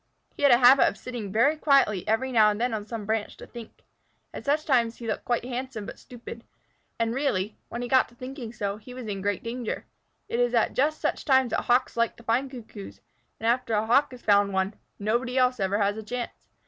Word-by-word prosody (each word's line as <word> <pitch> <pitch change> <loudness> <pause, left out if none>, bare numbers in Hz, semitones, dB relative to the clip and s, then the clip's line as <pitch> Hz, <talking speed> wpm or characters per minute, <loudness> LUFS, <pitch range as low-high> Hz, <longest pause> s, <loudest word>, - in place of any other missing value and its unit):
He - - -9
had 285 -2 +6
a 240 - +8
habit 260 +2 +7
of - - -2
sitting 235 -6 -6
very 235 +9 +3
quietly 275 - +2
every 240 +4 0
now 220 -3 +5
and 210 0 -2
then 245 0 0
on 210 -1 -4
some 225 -2 -5
branch 215 0 -2
to - - -10
think. 235 -2 -12 0.5
At - - -8
such 295 +2 +1
times 235 -5 +2
he 235 - -9
looked 220 +2 -4 0.2
handsome 250 -3 -5
but - - -9
stupid, 235 -2 -10 0.5
and 230 0 0
really, 220 -7 -1
when 240 +1 -4
he - - -3
got 260 +1 +3
to 240 - -21
thinking 255 -2 -7
so, 205 -3 -3
he 250 +4 -12
was 255 -2 -7
in 200 -2 -4
great 205 0 -1
danger. 235 0 -4 0.4
It 235 - -2
is 245 0 +2
at 230 - +2
just 300 +4 +1
such - - -1
times 265 -4 +3
that - - 0
Hawks 245 +1 +2
like 235 0 +1
to 235 - -16
find 245 +4 0
Cuckoos, 100 - -10 0.4
and 225 - -6
after 235 -1 +1
a 210 +1 +1
Hawk 275 +6 +4
has 250 -2 -12
found 200 -1 +3
one, 190 +2 0 0.2
nobody 235 +5 -1
else 250 -1 +3
ever 195 +1 +1
has 205 0 +1
a - - -4
chance. 245 +3 -6
235 Hz, 225 wpm, -26 LUFS, 215-255 Hz, 0.5 s, a